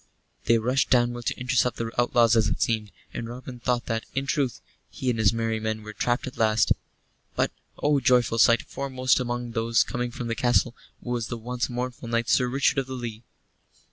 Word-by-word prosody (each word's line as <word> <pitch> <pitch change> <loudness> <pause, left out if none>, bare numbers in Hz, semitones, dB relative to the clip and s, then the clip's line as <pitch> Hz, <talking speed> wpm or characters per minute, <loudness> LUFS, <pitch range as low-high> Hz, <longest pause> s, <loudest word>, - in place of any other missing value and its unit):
They 115 +1 +5
rushed 125 +4 +1
downward 120 -1 +2
to - - -1
intercept 125 -1 +1
the 115 -1 -3
outlaws 120 -1 +4
as 110 -1 +3
it - - -2
seemed, 110 -3 0 0.2
and 115 - -5
Robin 125 0 -8
thought 120 0 0
that, 115 0 -2
in 135 +1 0
truth, 135 -3 -1 0.3
he 130 -1 -2
and 115 - -3
his 110 -4 +5
merry 115 -1 -1
men 110 0 -3
were 110 0 -8
trapped 120 +3 0
at 130 - -8
last. 110 -1 +3 0.6
But - - +1 0.3
oh, 145 -1 +2
joyful 125 -2 +3
sight! 115 +2 +5
foremost 130 -2 0
among 120 -1 -3
those 115 0 +2
coming 120 -1 -3
from 120 0 -6
the 115 - -1
castle 120 +1 +2 0.3
was 120 -2 -2
the 120 - -4
once 125 +2 -3
mournful 125 0 -4
knight 115 0 0
Sir 125 - +3
Richard 135 +2 +2
of 135 - -3
the 130 - -5
Lee. 115 -3 -6
120 Hz, 200 wpm, -26 LUFS, 115-125 Hz, 0.6 s, They